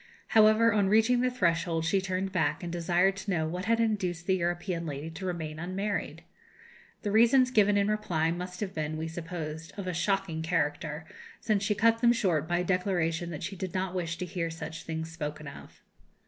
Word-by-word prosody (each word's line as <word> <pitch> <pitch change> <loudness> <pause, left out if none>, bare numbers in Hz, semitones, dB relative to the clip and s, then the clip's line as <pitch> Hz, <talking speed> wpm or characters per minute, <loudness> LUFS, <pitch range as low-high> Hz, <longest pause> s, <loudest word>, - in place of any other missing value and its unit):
However, 220 0 +5
on 200 -2 +2
reaching 225 +4 +4
the 255 - +2
threshold 170 -7 0
she 190 +4 +2
turned 190 0 -2
back, 180 -1 0
and 170 - -4
desired 175 +3 +2
to 195 +1 -6
know 160 -4 +1
what 180 +4 -4
had 230 +1 +2
induced 185 -7 0
the 190 - +3
European 175 0 -2
lady 145 +2 -5
to 185 +3 -6
remain 160 -3 -4
unmarried. 195 +4 -3 0.8
The 205 - -1
reasons 240 +4 +5
given 205 -3 +4
in 200 0 +2
reply 185 -7 0
must 180 +2 -5
have 195 -2 -3
been, 155 -1 -3
we 160 +1 -3
suppose, 160 -1 -6
of 200 - -4
a 180 - -2
shocking 190 -2 0
character, 155 -1 -1 0.3
since 215 -3 +1
she 210 +1 +1
cut 230 +2 +3
them 240 -1 +6
short 170 -9 +1
by 175 +1 +1
a 180 - 0
declaration 175 -2 0
that 155 -3 -6
she 195 - -4
did 185 -1 -5
not 185 -1 -1
wish 170 -2 -2
to 180 - -3
hear 170 -2 -3
such 165 0 -7
things 160 0 -4
spoken 150 -1 -5
of. 140 - -12
180 Hz, 200 wpm, -29 LUFS, 165-200 Hz, 0.8 s, them